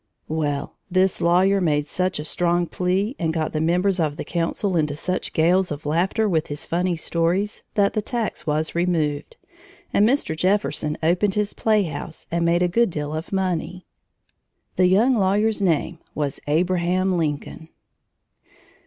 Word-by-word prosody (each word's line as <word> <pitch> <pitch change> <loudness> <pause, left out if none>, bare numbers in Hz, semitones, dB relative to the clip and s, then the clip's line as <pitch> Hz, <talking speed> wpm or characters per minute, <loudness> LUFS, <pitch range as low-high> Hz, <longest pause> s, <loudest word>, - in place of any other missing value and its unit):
Well 150 -2 -2
this 185 0 +1
lawyer 190 +3 +3
made 150 -4 +1
such 185 +4 -1
a 150 - -4
strong 175 +1 +1
plea, 185 +8 -1
and 165 -1 0
got 160 -1 -2
the 155 - -1
members 180 +4 +1
of 155 -2 0
the - - -4
council 175 +3 -1
into 150 -3 +1
such 185 +4 -3
gales 180 +3 +2
of 150 0 -6
laughter 180 +8 +1
with 160 -5 0
his 145 0 -6
funny 175 +1 0
stories, 175 +6 -1
that 200 -1 +3
the 215 - 0
tax 230 -3 -3
was 155 +1 0
removed, 170 - -1 0.6
and 210 +2 +4
Mr. 260 - +1
Jefferson 180 -4 0
opened 180 +5 +2
his 210 -1 0
playhouse 180 -8 -1
and 170 0 0
made 170 +1 +2
a - - +3
good 230 +6 +2
deal 150 -3 -4
of 160 +1 -5
money. 185 -1 -2 0.9
The 185 - +4
young 220 +8 +4
lawyer's 205 +1 +2
name 170 -2 0 0.2
was 145 -2 -2
Abraham 180 +3 +1
Lincoln! 160 0 -3
175 Hz, 155 wpm, -23 LUFS, 160-190 Hz, 0.9 s, and